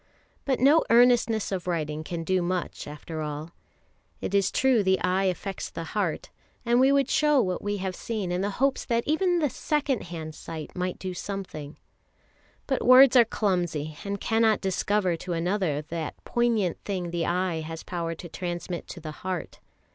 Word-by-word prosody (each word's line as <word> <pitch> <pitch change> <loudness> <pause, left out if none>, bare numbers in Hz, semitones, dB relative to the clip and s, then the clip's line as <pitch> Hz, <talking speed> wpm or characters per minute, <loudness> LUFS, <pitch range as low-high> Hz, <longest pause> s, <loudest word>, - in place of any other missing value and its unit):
But 265 -3 +1
no 290 +5 +5
earnestness 235 -2 +4
of 185 -2 -3
writing 155 -3 -2
can 165 +1 -4
do 185 +2 +1
much 180 0 -3
after 155 +2 -6
all. 150 +2 -5 0.7
It - - -4
is 200 -1 +3
true 260 -4 +3
the 190 -1 +2
eye 185 +2 +1
affects 190 +1 -3
the 165 - -6
heart, 185 -1 -2 0.3
and 240 +1 +3
we 265 +1 +5
would 280 -2 +3
show 300 -2 +3
what 185 -6 0
we 205 0 -2
have 190 -1 -3
seen 210 -6 -3
in 180 +1 0
the 200 - 0
hope 275 +1 +2
that 235 -1 +1
even 350 +4 +2
the 300 -4 +2
second 290 -5 -1
hand 160 -2 -6
sight 155 0 -8
might 180 0 -2
do 185 -1 -5
something; 180 -6 -6 0.9
but 270 - -1
words 255 +1 +8
are 245 - +9
clumsy, 175 -8 -1
and 200 0 -3
cannot 225 -1 +2
discover 190 -1 0
to 175 +2 -4
another 170 -3 0
that 160 0 -5
poignant 230 -7 +1
thing 180 -4 -3
the 170 -1 -1
eye 180 -1 0
has 160 +1 -6
power 170 -2 -3
to 175 - -9
transmit 175 0 -5
to 175 - -8
the 155 -1 -6
heart. 185 -2 -4
185 Hz, 180 wpm, -27 LUFS, 170-230 Hz, 0.9 s, are